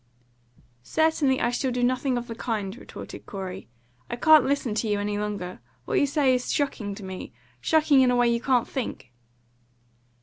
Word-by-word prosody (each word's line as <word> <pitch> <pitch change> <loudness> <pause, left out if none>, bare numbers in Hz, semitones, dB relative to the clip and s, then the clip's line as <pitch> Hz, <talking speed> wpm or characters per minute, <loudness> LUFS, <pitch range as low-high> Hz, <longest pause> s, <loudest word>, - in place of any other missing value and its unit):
"Certainly 300 - +2
I 240 - +2
shall 255 +2 -1
do 245 0 -1
nothing 255 +1 +1
of 240 - -3
the 230 - -6
kind," 215 -4 -3
retorted 250 - -10
Corey. 190 - -6 0.4
"I - - -2
can't 310 +4 +6
listen 270 -5 0
to 220 - -1
you 205 -1 +1
any 205 0 -2
longer. 200 -7 -4 0.3
What - - +1
you 285 - +3
say 280 -2 +3
is 250 0 -1
shocking 220 -8 -1
to 200 - -10
me 190 -1 -7 0.3
shocking 305 -4 +4
in 255 - +4
a 250 - +3
way 245 0 +4
you 235 0 +1
can't 250 -2 +2
think." 235 - -5
245 Hz, 180 wpm, -26 LUFS, 205-270 Hz, 0.4 s, can't